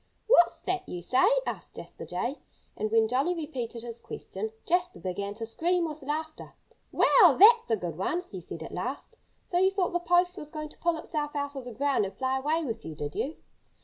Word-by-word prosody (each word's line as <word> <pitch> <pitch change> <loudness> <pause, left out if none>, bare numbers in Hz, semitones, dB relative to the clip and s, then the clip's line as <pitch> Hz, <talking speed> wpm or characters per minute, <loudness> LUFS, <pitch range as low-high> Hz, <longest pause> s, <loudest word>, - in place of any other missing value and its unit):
"What's 390 -7 +5
that 375 0 -3
you 175 -1 -5
say?" 260 - +4 0.2
asked - - -5
Jasper - - -9
Jay. - - -3 0.4
And 215 - -2
when 225 0 +4
Jolly 270 +10 +1
repeated 255 -8 -5
his 235 -1 -6
question, 215 +3 -6
Jasper 355 +1 +1
began 200 +2 -4
to 225 +1 -4
scream 340 +9 +1
with 310 -1 -6
laughter. 310 +3 -5 0.4
"Well, - - +6
that's 455 - +7
a 225 - +4
good 175 -3 -5
one!" 345 - -1
he 190 -3 -6
said 165 - -7
at - - -9
last. 260 - -5 0.3
"So 355 - 0
you 380 +1 +5
thought 385 -2 -1
the 350 - +2
post 355 +1 +2
was 300 - -8
going 305 -1 -6
to - - -15
pull 340 -1 +1
itself 300 -2 -4
out 285 0 -2
of 265 -2 -6
the 250 - -6
ground 275 -1 +1
and 195 - -8
fly 265 0 0
away 310 +4 0
with 230 -4 -4
you, 160 -1 -7
did 145 0 -5
you?" 295 +4 -2
285 Hz, 210 wpm, -28 LUFS, 225-345 Hz, 0.4 s, that's